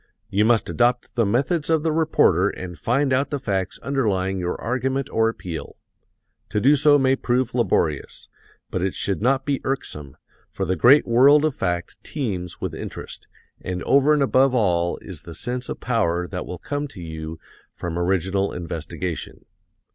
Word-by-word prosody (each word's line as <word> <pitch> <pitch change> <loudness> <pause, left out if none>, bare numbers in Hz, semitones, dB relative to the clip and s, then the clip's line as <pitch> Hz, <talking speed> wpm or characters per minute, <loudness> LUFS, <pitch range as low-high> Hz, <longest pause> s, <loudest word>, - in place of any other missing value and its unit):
You 100 +2 +3
must 115 -1 +3
adopt 120 0 +1
the 115 -3 +1
methods 140 - 0
of 160 -2 +2
the 160 - +1
reporter 160 0 +3
and 90 -1 -7
find 135 - +1
out 135 +2 +1
the 145 - -2
facts 95 -7 -2
underlying 95 -9 0
your 90 0 -3
argument 130 +3 -2
or 115 0 +3
appeal. 90 -7 -7 0.7
To 105 - 0
do 140 +7 +5
so 145 +1 +5
may 135 -1 +3
prove 125 -1 0
laborious, 90 - 0 0.4
but 90 - -2
it 95 0 -1
should 100 -1 -1
not 135 +3 +2
be 140 -2 -1
irksome, 75 - -4 0.3
for 95 - -3
the 95 +1 0
great 130 - +6
world 140 +6 +5
of 155 - +1
fact 85 -4 -3
teems 95 - -4
with - - -4
interest, - - -7 0.3
and 90 -1 -4
over 140 +2 +4
and 150 -2 +4
above 130 0 +3
all 85 -6 +1
is 90 -6 -9
the 85 - -10
sense 125 +7 -3
of - - -5
power 90 -8 0
that 90 0 -6
will 90 - -5
come 145 - -4
to 120 - -13
you 80 -1 -6 0.4
from 85 -1 -4
original 95 +2 0
investigation. 85 0 -5
115 Hz, 170 wpm, -23 LUFS, 90-135 Hz, 0.7 s, great